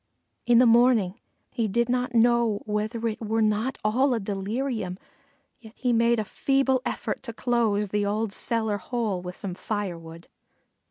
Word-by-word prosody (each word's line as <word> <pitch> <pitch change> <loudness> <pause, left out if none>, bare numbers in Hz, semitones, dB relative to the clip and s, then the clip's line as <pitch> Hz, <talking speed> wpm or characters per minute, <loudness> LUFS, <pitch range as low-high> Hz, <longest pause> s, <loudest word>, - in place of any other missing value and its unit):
In 240 -1 +5
the 250 - +6
morning 230 -4 +4 0.3
he 230 -2 -1
did 235 +4 +1
not 250 0 -1
know 235 -2 +3
whether 215 +2 -2
it 220 0 -4
were 220 0 0
not 215 +5 0
all 250 +5 +2
a - - -1
delirium, 205 0 -3 0.6
yet 220 -2 -14
he 250 -2 0
made 235 0 +3
a 215 - -1
feeble 270 +3 +1
effort - - -3
to 235 -3 -7
close 225 -4 0
the 210 +1 0
old 210 +1 -1
cellar 220 -3 -1
hole 215 -3 -2
with 180 0 -7
some 190 -3 -5
firewood. 170 -5 -5
225 Hz, 160 wpm, -26 LUFS, 205-240 Hz, 0.6 s, the